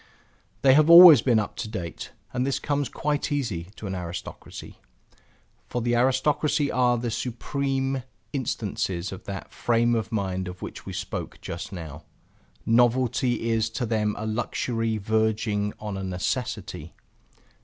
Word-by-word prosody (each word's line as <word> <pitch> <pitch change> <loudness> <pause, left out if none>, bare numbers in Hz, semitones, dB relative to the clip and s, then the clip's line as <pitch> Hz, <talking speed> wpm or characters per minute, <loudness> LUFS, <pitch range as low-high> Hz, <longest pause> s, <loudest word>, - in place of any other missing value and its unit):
They 135 -1 +7
have 155 +3 +5
always 170 -6 +11
been 120 -3 +3
up 105 - -1
to 115 - -4
date, 90 -7 -6 0.2
and 125 - 0
this 135 0 0
comes 145 -2 -1
quite 150 +1 -2
easy 115 -13 -2
to - - -9
an 95 - -3
aristocracy. 90 -1 -7 0.9
For 125 - -3
the 120 0 0
aristocracy 140 +4 +2
are 125 -1 +2
the 120 0 -3
supreme 135 +3 -2 0.3
instances 105 -8 -2
of 95 - -9
that 100 -1 -7
frame 120 0 +1
of 110 -4 -1
mind 95 -4 -2
of 90 0 -8
which - - -8
we - - -5
spoke - - -5
just 95 +6 -6
now. 80 -4 -8 0.6
Novelty 120 0 +2
is 115 0 +1
to 120 +2 -3
them 110 -2 0
a 110 - -4
luxury 115 0 -1
verging 110 0 0
on 105 -2 -5
a 95 - -4
necessity. 95 +7 -3
115 Hz, 145 wpm, -25 LUFS, 105-130 Hz, 0.9 s, always